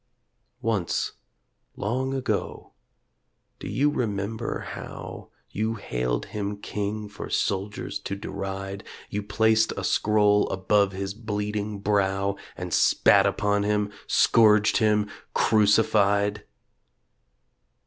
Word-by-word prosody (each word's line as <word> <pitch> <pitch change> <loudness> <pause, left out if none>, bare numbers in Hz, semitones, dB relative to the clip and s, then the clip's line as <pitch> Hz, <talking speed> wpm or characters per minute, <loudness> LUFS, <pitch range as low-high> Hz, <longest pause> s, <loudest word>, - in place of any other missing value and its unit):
Once... 105 -7 0 0.6
long 130 +6 -2
ago... 135 -2 -3 0.9
do - - -7
you 145 +2 +1
remember 110 -4 -2
how - - -8 0.2
You 110 +2 -1
hailed 60 - -2
Him 105 -1 -3
king 105 +1 -4
for 105 - -8
soldiers 100 +1 -2
to 100 - -4
deride 95 0 -5 0.3
You 105 - -2
placed 110 +2 +2
a - - -3
scroll 105 -1 +3
above 100 +1 +2
His 95 +1 -4
bleeding 105 -1 -3
brow 100 -1 +1 0.2
And 90 -2 -5
spat - - +5
upon 105 0 +1
Him, 105 0 0 0.2
scourged 105 -2 +5
Him, 105 -1 +2 0.3
crucified 105 -1 +3
105 Hz, 100 wpm, -25 LUFS, 100-110 Hz, 0.9 s, spat